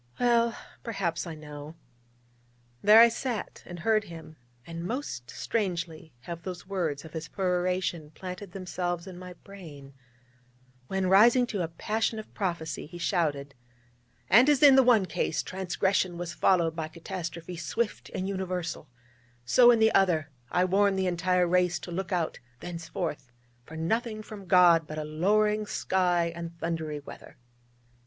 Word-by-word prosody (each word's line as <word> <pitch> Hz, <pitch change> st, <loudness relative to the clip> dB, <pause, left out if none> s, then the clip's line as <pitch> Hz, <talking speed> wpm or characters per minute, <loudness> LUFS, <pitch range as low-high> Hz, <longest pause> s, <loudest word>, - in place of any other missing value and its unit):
Well, 235 Hz, -1 st, +3 dB, 0.2 s
perhaps 185 Hz, -7 st, -2 dB
I 165 Hz, -, -6 dB
know. 150 Hz, 0 st, -10 dB, 1.1 s
There 210 Hz, +2 st, +8 dB
I 235 Hz, -, +10 dB
sat, 235 Hz, -1 st, -4 dB
and 175 Hz, -, -7 dB
heard 215 Hz, +1 st, +2 dB
him: 160 Hz, -3 st, -11 dB, 0.3 s
and 165 Hz, 0 st, -6 dB
most 175 Hz, -, -4 dB
strangely 170 Hz, -7 st, -3 dB
have 170 Hz, +5 st, -7 dB
those 180 Hz, 0 st, -7 dB
words 165 Hz, -7 st, -2 dB
of 160 Hz, -, -12 dB
his 160 Hz, 0 st, -5 dB
peroration 180 Hz, -3 st, -1 dB
planted 180 Hz, +4 st, -8 dB
themselves 175 Hz, -2 st, -3 dB
in 190 Hz, -2 st, -9 dB
my 180 Hz, 0 st, -9 dB
brain, 160 Hz, -8 st, -12 dB, 0.9 s
when, 190 Hz, +3 st, -1 dB
rising 230 Hz, +6 st, +6 dB
to 205 Hz, -5 st, -3 dB
a 170 Hz, -, -1 dB
passion 220 Hz, +7 st, -2 dB
of 215 Hz, -, -9 dB
prophecy, 170 Hz, -7 st, -3 dB
he 175 Hz, -, -10 dB
shouted: 150 Hz, -6 st, -1 dB, 0.7 s
'And 240 Hz, -, +6 dB
as 290 Hz, -1 st, +3 dB
in 280 Hz, -2 st, +9 dB
the 265 Hz, -, +8 dB
one 240 Hz, -6 st, +4 dB
case, -, -, -1 dB
transgression 190 Hz, -1 st, -1 dB
was 175 Hz, -1 st, -5 dB
followed 165 Hz, 0 st, +2 dB
by 160 Hz, -1 st, -3 dB
catastrophe 170 Hz, +1 st, -6 dB
swift 210 Hz, +7 st, -3 dB
and 185 Hz, -, -2 dB
universal, 185 Hz, -5 st, -4 dB, 0.6 s
so, 240 Hz, -, +6 dB
in 240 Hz, -, +6 dB
the 220 Hz, 0 st, +4 dB
other, 160 Hz, -6 st, +2 dB, 0.2 s
I 180 Hz, +1 st, +2 dB
warn 200 Hz, +2 st, +3 dB
the 190 Hz, 0 st, 0 dB
entire 180 Hz, 0 st, +2 dB
race 180 Hz, 0 st, +2 dB
to 175 Hz, -, -9 dB
look 190 Hz, +3 st, -4 dB
out 175 Hz, -3 st, -1 dB, 0.2 s
thenceforth 165 Hz, -5 st, -5 dB, 0.3 s
for 160 Hz, -, -10 dB
nothing 215 Hz, +6 st, -1 dB
from 205 Hz, -3 st, -10 dB
God 175 Hz, -3 st, +5 dB
but 155 Hz, -, -7 dB
a 155 Hz, -, -2 dB
lowering 210 Hz, +7 st, +1 dB
sky, 175 Hz, -4 st, +1 dB
and 170 Hz, 0 st, -7 dB
thundery 160 Hz, -3 st, -3 dB
weather.' -, -, -12 dB
180 Hz, 150 wpm, -28 LUFS, 165-200 Hz, 1.1 s, I